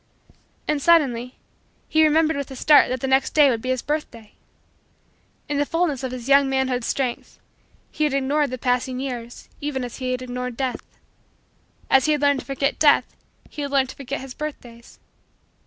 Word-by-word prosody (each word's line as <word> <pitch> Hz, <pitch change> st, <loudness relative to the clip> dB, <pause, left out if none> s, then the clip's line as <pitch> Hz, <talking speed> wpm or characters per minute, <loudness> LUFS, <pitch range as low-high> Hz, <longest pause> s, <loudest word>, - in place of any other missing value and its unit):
And, 300 Hz, -1 st, 0 dB
suddenly, 265 Hz, -7 st, +2 dB, 0.5 s
he 315 Hz, 0 st, +3 dB
remembered 315 Hz, +1 st, +3 dB
with 280 Hz, -1 st, -4 dB
a 265 Hz, -, -8 dB
start 300 Hz, +3 st, +5 dB
that 255 Hz, 0 st, -3 dB
the 265 Hz, -, -1 dB
next 265 Hz, 0 st, +1 dB
day 290 Hz, -3 st, +6 dB
would 230 Hz, -2 st, -2 dB
be 255 Hz, -, -5 dB
his 255 Hz, -1 st, -1 dB
birthday. 260 Hz, -8 st, -5 dB, 1.1 s
In 290 Hz, -1 st, -1 dB
the -, -, +3 dB
fullness 330 Hz, -6 st, -1 dB
of 260 Hz, -, -3 dB
his 250 Hz, -1 st, -7 dB
young 275 Hz, 0 st, +5 dB
manhood's 260 Hz, -2 st, 0 dB
strength, 255 Hz, -3 st, -3 dB, 0.5 s
he 305 Hz, -, 0 dB
had 295 Hz, -, 0 dB
ignored 280 Hz, +2 st, +1 dB
the 255 Hz, -, -5 dB
passing 250 Hz, +1 st, -1 dB
years 245 Hz, -3 st, -6 dB
even 285 Hz, -3 st, -3 dB
as 245 Hz, -, -7 dB
he 255 Hz, -1 st, -3 dB
had 255 Hz, 0 st, -2 dB
ignored 250 Hz, -1 st, -5 dB
Death. 260 Hz, -2 st, -2 dB, 1.1 s
As 265 Hz, -1 st, +4 dB
he 310 Hz, -, +3 dB
had 295 Hz, -, -1 dB
learned 285 Hz, -1 st, +3 dB
to -, -, -10 dB
forget 275 Hz, +1 st, -1 dB
Death, 295 Hz, -2 st, +3 dB, 0.3 s
he 300 Hz, -, -8 dB
had 285 Hz, -, -3 dB
learned 270 Hz, -2 st, +1 dB
to -, -, -9 dB
forget 275 Hz, 0 st, -5 dB
his 265 Hz, -1 st, -8 dB
birthdays. 245 Hz, -6 st, -9 dB
265 Hz, 190 wpm, -22 LUFS, 250-290 Hz, 1.1 s, day